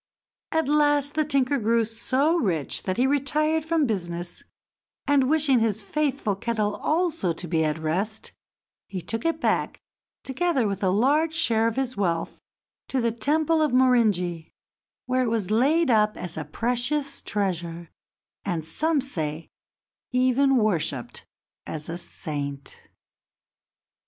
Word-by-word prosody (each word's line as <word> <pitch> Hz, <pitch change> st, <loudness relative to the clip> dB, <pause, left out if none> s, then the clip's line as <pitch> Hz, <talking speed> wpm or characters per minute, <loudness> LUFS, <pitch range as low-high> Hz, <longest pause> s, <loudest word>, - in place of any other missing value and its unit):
At 320 Hz, -3 st, +1 dB
last 290 Hz, -1 st, +3 dB
the 310 Hz, -, +2 dB
tinker 280 Hz, -1 st, +1 dB
grew 230 Hz, +1 st, +2 dB
so 260 Hz, +8 st, +1 dB
rich 175 Hz, -, -1 dB
that 185 Hz, -, -1 dB
he 250 Hz, -, +3 dB
retired 300 Hz, +3 st, +1 dB
from 320 Hz, -1 st, +1 dB
business, 175 Hz, -6 st, -3 dB, 0.7 s
and, 275 Hz, -2 st, +3 dB
wishing 295 Hz, -5 st, +3 dB
his 220 Hz, -2 st, 0 dB
faithful 275 Hz, -3 st, -1 dB
kettle 215 Hz, 0 st, -1 dB
also 310 Hz, -, 0 dB
to 175 Hz, +2 st, -6 dB
be 160 Hz, 0 st, +1 dB
at 155 Hz, 0 st, 0 dB
rest, 185 Hz, +8 st, -2 dB, 0.6 s
he 190 Hz, -, -5 dB
took 225 Hz, -, -4 dB
it 330 Hz, -1 st, +1 dB
back, -, -, 0 dB, 0.4 s
together 270 Hz, -3 st, 0 dB
with 200 Hz, -1 st, -3 dB
a 190 Hz, -, +2 dB
large 290 Hz, -, +2 dB
share 230 Hz, -9 st, +2 dB
of 230 Hz, -, -2 dB
his 265 Hz, -2 st, -2 dB
wealth, 170 Hz, -5 st, -1 dB, 0.5 s
to 265 Hz, -, -1 dB
the 235 Hz, -1 st, +1 dB
temple 310 Hz, +8 st, +1 dB
of 300 Hz, -4 st, +1 dB
Morinji, 210 Hz, -10 st, +2 dB, 0.6 s
where 255 Hz, +1 st, +1 dB
it 250 Hz, -, +1 dB
was 220 Hz, -4 st, -1 dB
laid 280 Hz, +6 st, +3 dB
up 215 Hz, -1 st, +3 dB
as 180 Hz, -, -5 dB
a 155 Hz, -, -4 dB
precious 245 Hz, -, -1 dB
treasure 170 Hz, -4 st, -3 dB, 0.5 s
and, 170 Hz, -5 st, -2 dB
some 305 Hz, -, +1 dB
say, 160 Hz, -, -5 dB, 0.6 s
even 255 Hz, +2 st, +3 dB
worshiped 170 Hz, -, -1 dB, 0.4 s
as 155 Hz, 0 st, -5 dB
a 170 Hz, -, -3 dB
saint. 140 Hz, -4 st, -5 dB
235 Hz, 140 wpm, -25 LUFS, 185-285 Hz, 0.7 s, last